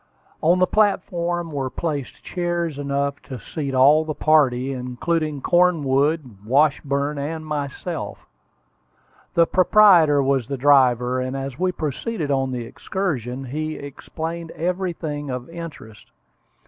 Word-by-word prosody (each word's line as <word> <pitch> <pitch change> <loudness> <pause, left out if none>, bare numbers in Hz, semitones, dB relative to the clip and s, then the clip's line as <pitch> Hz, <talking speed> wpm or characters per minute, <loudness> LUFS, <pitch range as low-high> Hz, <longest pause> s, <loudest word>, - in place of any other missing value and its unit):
On 170 +3 +4
the 185 - +4
platform 175 -4 0
were 135 -3 -2
placed 145 -3 -4
chairs 175 -4 -2
enough 140 0 -2
to 130 -3 -8
seat 140 +6 -4
all 145 +4 +6
the 155 -1 -4
party, 135 -4 +3
including 140 +4 -2
Cornwood, 150 - +2
Washburn, 140 +3 +1
and 155 +3 -4
myself. 145 -3 -5 1.1
The 170 - +5
proprietor 175 -6 +5
was 135 -3 +1
the 140 0 -3
driver, 130 -2 +4
and 130 +1 -3
as 135 -1 -6
we 185 0 +1
proceeded 155 - -3
on 135 -1 0
the 120 -2 -4
excursion, 135 - -3
he 155 +4 -4
explained 160 +4 -6
everything 170 -5 -3
of 125 -1 -4
interest. 160 -11 -10
145 Hz, 120 wpm, -22 LUFS, 135-170 Hz, 1.1 s, all